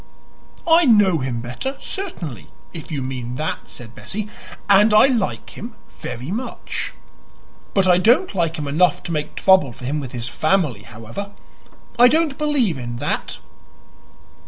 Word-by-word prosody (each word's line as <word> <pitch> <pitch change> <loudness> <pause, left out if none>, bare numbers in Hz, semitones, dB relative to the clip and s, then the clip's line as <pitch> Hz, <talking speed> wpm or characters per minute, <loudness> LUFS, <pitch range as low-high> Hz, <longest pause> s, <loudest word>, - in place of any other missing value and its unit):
"I 335 +1 +6
know 205 - +5
him 125 -3 -3
better, 125 - -5
certainly, 165 - -5 0.3
if 165 0 -8
you 140 -4 -2
mean 125 -2 -5
that," 155 +4 -4
said 120 -2 -10
Bessie. 210 - -5 0.4
"And 210 +2 +6
I 215 - +8
like 240 -8 -1
him 225 +1 -9 0.2
very 125 +5 -6
much. 240 +6 -4 0.8
But 195 -2 +4
I 180 -1 +5
don't 240 - +3
like 165 -4 0
him 150 -2 -4
enough 160 +3 +2
to - - -5
make 150 -2 -3
trouble 190 -9 +4
for 125 +1 -10
him 145 +4 -1
with 135 -4 -6
his 120 -1 -5
family. 155 - 0
However, 115 - -8 0.7
I 245 - +9
don't 310 0 +1
believe 265 - +1
in 120 -1 -5
that." 120 - -3
165 Hz, 155 wpm, -21 LUFS, -, 0.8 s, I